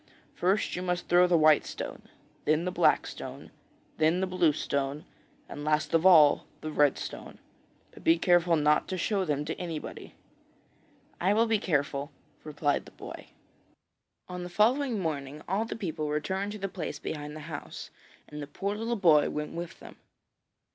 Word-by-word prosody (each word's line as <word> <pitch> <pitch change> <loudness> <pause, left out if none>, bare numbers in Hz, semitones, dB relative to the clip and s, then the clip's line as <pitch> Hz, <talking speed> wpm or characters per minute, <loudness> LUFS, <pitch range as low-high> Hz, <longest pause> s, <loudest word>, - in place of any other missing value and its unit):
'First 190 +4 0
you 180 - -3
must 180 -1 -2
throw 180 +1 +5
the 175 -1 +4
white 155 -1 +5
stone, - - -6 0.4
then 155 +3 +2
the 180 - -1
black - - +3
stone, - - -8 0.5
then 160 +3 +3
the 190 - +1
blue 180 -4 +2
stone, 140 0 -2 0.4
and 145 - -7
last 150 +1 0
of 165 +3 +5
all 155 -6 +6
the 155 - -4
red 145 -2 +3
stone. - - -7 0.5
But - - -15
be 165 +1 +5
careful 175 0 +3
not 150 0 +2
to 185 - -3
show 195 +2 0
them 150 -2 -1
to 160 - -2
anybody.' 165 -4 -6 1.1
'I 190 +3 +3
will 225 +2 +4
be 220 -2 +1
careful,' 140 -5 -1 0.3
replied 145 -1 -1
the - - -13
boy. - - -10 1.0
On 180 0 -6
the 180 - -6
following 240 +6 +2
morning 150 -4 -4
all 200 +5 0
the - - -5
people 160 -8 -3
returned 190 +7 -2
to - - -6
the 195 -1 -3
place 180 -4 -5
behind 150 -1 -6
the 155 - -8
house, 155 -1 -8 0.4
and 150 0 -8
the 145 - -6
poor 200 +8 -3
little 230 +2 -2
boy 165 -8 +4
went 150 0 -4
with 170 0 -6
them. - - -13
165 Hz, 175 wpm, -29 LUFS, 150-185 Hz, 1.1 s, all